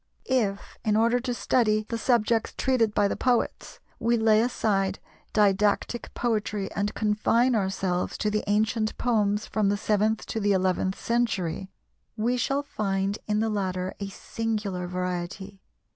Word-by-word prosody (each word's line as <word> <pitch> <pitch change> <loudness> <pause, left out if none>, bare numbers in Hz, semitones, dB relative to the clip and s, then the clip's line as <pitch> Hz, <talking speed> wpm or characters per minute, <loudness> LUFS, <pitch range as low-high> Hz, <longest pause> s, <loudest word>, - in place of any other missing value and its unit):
If, 215 -7 -1
in 215 -2 +2
order 235 +2 +3
to 250 0 -3
study 215 -3 +2
the 230 - -2
subjects 230 -1 +1
treated 235 -5 +1
by 205 -1 +4
the - - -2
poets, 250 -2 -1 0.2
we 235 +1 +2
lay 220 -1 +4
aside 200 -5 0 0.3
didactic 210 +3 +1
poetry 210 -4 -1
and 205 +1 -1
confine 225 +4 +2
ourselves 190 -3 -1
to 210 - 0
the 210 0 0
ancient 215 +1 +1
poems 210 -3 +1
from 210 -2 0
the 205 - +1
seventh 215 +1 +1
to 225 - -3
the 205 -1 +2
eleventh 185 0 0
century, 195 -6 -1 0.5
we 235 +3 +1
shall 275 +3 0
find 195 -6 -2
in 210 0 +1
the 225 - +1
latter 185 -2 -2
a 200 - -3
singular 210 -3 -3
variety. 180 +2 -4
210 Hz, 145 wpm, -26 LUFS, 195-225 Hz, 0.5 s, by